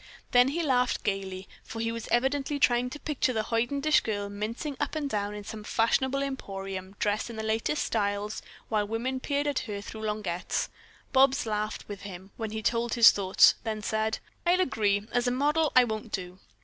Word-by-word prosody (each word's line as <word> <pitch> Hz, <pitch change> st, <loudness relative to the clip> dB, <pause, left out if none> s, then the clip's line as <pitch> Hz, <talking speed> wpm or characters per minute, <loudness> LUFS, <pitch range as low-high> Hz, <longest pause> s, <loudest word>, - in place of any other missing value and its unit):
Then 245 Hz, +1 st, +6 dB
he 330 Hz, +5 st, -1 dB
laughed 250 Hz, -4 st, +1 dB
gaily, 190 Hz, -2 st, -3 dB, 0.2 s
for 225 Hz, -, -7 dB
he 230 Hz, 0 st, 0 dB
was 230 Hz, -1 st, -5 dB
evidently 270 Hz, +4 st, +1 dB
trying 245 Hz, -2 st, +3 dB
to 295 Hz, -, -8 dB
picture 280 Hz, -4 st, 0 dB
the 220 Hz, -2 st, 0 dB
hoidenish 275 Hz, +7 st, +2 dB
girl 205 Hz, -2 st, -3 dB
mincing 220 Hz, +8 st, -4 dB
up 290 Hz, +1 st, -2 dB
and 300 Hz, -2 st, -1 dB
down 205 Hz, -4 st, -2 dB
in 205 Hz, -, -7 dB
some 215 Hz, +1 st, -7 dB
fashionable 265 Hz, +6 st, +1 dB
emporium 195 Hz, -7 st, -5 dB
dressed 210 Hz, +3 st, 0 dB
in 230 Hz, -, -7 dB
the 220 Hz, -, -4 dB
latest 220 Hz, +7 st, 0 dB
styles, 205 Hz, -1 st, -1 dB, 0.3 s
while 210 Hz, -2 st, 0 dB
women 245 Hz, +4 st, -2 dB
peered 285 Hz, +2 st, -1 dB
at 290 Hz, -2 st, +1 dB
her 205 Hz, -2 st, -5 dB
through 220 Hz, +2 st, -8 dB
lorgnettes. 210 Hz, -5 st, -2 dB, 0.4 s
Bobs 270 Hz, 0 st, +4 dB
laughed 215 Hz, 0 st, -3 dB
with 205 Hz, -1 st, -7 dB
him 190 Hz, -1 st, -9 dB
when 225 Hz, -1 st, -4 dB
he 220 Hz, +1 st, -5 dB
told 230 Hz, +1 st, +1 dB
his 235 Hz, -1 st, +9 dB
thoughts, 190 Hz, -1 st, +5 dB
then 215 Hz, -2 st, -3 dB
said: 220 Hz, 0 st, 0 dB, 0.3 s
"I'll 350 Hz, +1 st, +3 dB
agree, 210 Hz, -, +1 dB
as 245 Hz, +1 st, +1 dB
a -, -, +2 dB
model, 295 Hz, +4 st, +2 dB
I 255 Hz, -, +8 dB
won't 220 Hz, -2 st, -4 dB
do." 180 Hz, -1 st, -5 dB
225 Hz, 190 wpm, -28 LUFS, 205-260 Hz, 0.4 s, his